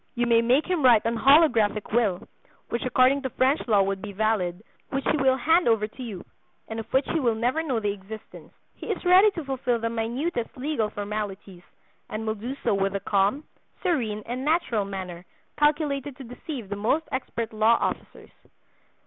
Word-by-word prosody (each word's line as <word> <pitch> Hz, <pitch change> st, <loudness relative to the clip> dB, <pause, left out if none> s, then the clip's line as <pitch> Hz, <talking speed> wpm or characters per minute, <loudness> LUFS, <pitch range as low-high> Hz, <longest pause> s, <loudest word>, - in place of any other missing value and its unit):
You 240 Hz, 0 st, +1 dB
may 230 Hz, -1 st, +4 dB
make 250 Hz, +6 st, +3 dB
him 360 Hz, -3 st, -1 dB
write 235 Hz, -4 st, +6 dB
an 230 Hz, +1 st, 0 dB
holographic 230 Hz, -6 st, +4 dB
will 210 Hz, -7 st, +1 dB, 0.4 s
(which 235 Hz, -, -2 dB
according 255 Hz, +2 st, +3 dB
to 265 Hz, -, -3 dB
French 265 Hz, +5 st, +1 dB
law 205 Hz, -4 st, +4 dB
would 195 Hz, 0 st, -2 dB
be 205 Hz, 0 st, -7 dB
valid), 200 Hz, -3 st, -1 dB, 0.3 s
which 270 Hz, 0 st, -3 dB
he -, -, +2 dB
will 265 Hz, -2 st, +3 dB
hand 325 Hz, +7 st, +3 dB
over 225 Hz, -2 st, +3 dB
to 235 Hz, +4 st, -13 dB
you, 215 Hz, -8 st, -7 dB, 0.4 s
and 225 Hz, 0 st, -5 dB
of 225 Hz, -, -8 dB
which 265 Hz, +1 st, +2 dB
he 330 Hz, -, 0 dB
will 235 Hz, -5 st, +1 dB
never 245 Hz, +8 st, 0 dB
know 265 Hz, -8 st, -1 dB
the 205 Hz, -2 st, -1 dB
existence. 205 Hz, +2 st, -11 dB, 0.2 s
He -, -, -10 dB
is -, -, -3 dB
ready 370 Hz, +4 st, +7 dB
to 340 Hz, -5 st, -6 dB
fulfill 260 Hz, -3 st, -1 dB
the 230 Hz, 0 st, -2 dB
minutest 235 Hz, +4 st, -3 dB
legal 255 Hz, -5 st, -1 dB
formalities, 205 Hz, -3 st, -5 dB, 0.5 s
and 220 Hz, +1 st, -4 dB
will 220 Hz, -, 0 dB
do 235 Hz, +5 st, -6 dB
so -, -, +2 dB
with 195 Hz, 0 st, 0 dB
a -, -, 0 dB
calm, 200 Hz, +8 st, +1 dB, 0.4 s
serene 235 Hz, -, -1 dB
and 250 Hz, +2 st, -4 dB
natural 275 Hz, -, +1 dB
manner 185 Hz, -3 st, -6 dB, 0.4 s
calculated 290 Hz, -2 st, +1 dB
to 275 Hz, -, -9 dB
deceive 245 Hz, -2 st, -8 dB
the 205 Hz, -, -3 dB
most 235 Hz, +10 st, 0 dB
expert 235 Hz, -3 st, -4 dB
law 220 Hz, +2 st, +4 dB
officers. -, -, -4 dB
235 Hz, 190 wpm, -25 LUFS, 210-275 Hz, 0.5 s, ready